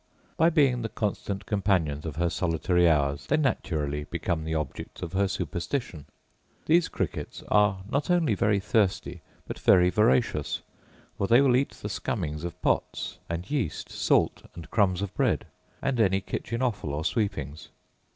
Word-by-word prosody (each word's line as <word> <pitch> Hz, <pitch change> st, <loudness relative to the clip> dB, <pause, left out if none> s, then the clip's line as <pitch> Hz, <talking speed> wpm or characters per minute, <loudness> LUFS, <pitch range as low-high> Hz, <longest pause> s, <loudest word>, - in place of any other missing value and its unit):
By 165 Hz, +1 st, +4 dB
being 140 Hz, -7 st, +3 dB
the 115 Hz, -, -3 dB
constant 100 Hz, -2 st, -3 dB
companions 90 Hz, -8 st, 0 dB
of 75 Hz, -, -5 dB
her 85 Hz, +1 st, 0 dB
solitary 90 Hz, +1 st, +2 dB
hours 70 Hz, -2 st, +1 dB
they 155 Hz, -, +2 dB
naturally 75 Hz, -, -1 dB
become 85 Hz, -1 st, -2 dB
the 80 Hz, 0 st, -2 dB
objects 75 Hz, +2 st, -5 dB
of 85 Hz, 0 st, -6 dB
her 100 Hz, +1 st, +2 dB
superstition. 85 Hz, -, -3 dB, 0.6 s
These 165 Hz, +1 st, +3 dB
crickets -, -, -4 dB
are 105 Hz, -2 st, +3 dB
not 140 Hz, +8 st, -1 dB
only 175 Hz, -9 st, +3 dB
very 105 Hz, 0 st, +2 dB
thirsty, 100 Hz, -1 st, 0 dB, 0.3 s
but -, -, -6 dB
very 90 Hz, 0 st, +5 dB
voracious; 105 Hz, -, +1 dB, 0.6 s
for 100 Hz, -, +1 dB
they 120 Hz, +4 st, +6 dB
will 135 Hz, -3 st, +4 dB
eat 135 Hz, +2 st, +1 dB
the -, -, -7 dB
scummings 80 Hz, -7 st, -3 dB
of 85 Hz, -1 st, -6 dB
pots, -, -, -1 dB
and 85 Hz, +6 st, -4 dB
yeast, 125 Hz, -, -2 dB
salt, -, -, +2 dB
and 85 Hz, -2 st, -10 dB
crumbs 100 Hz, -4 st, +2 dB
of 100 Hz, -, -5 dB
bread; -, -, +1 dB, 0.4 s
and 135 Hz, -3 st, 0 dB
any 95 Hz, -3 st, +3 dB
kitchen 115 Hz, +5 st, -4 dB
offal 105 Hz, -, -1 dB
or 75 Hz, +2 st, -3 dB
sweepings. 80 Hz, -, -2 dB
95 Hz, 160 wpm, -27 LUFS, 80-115 Hz, 0.6 s, they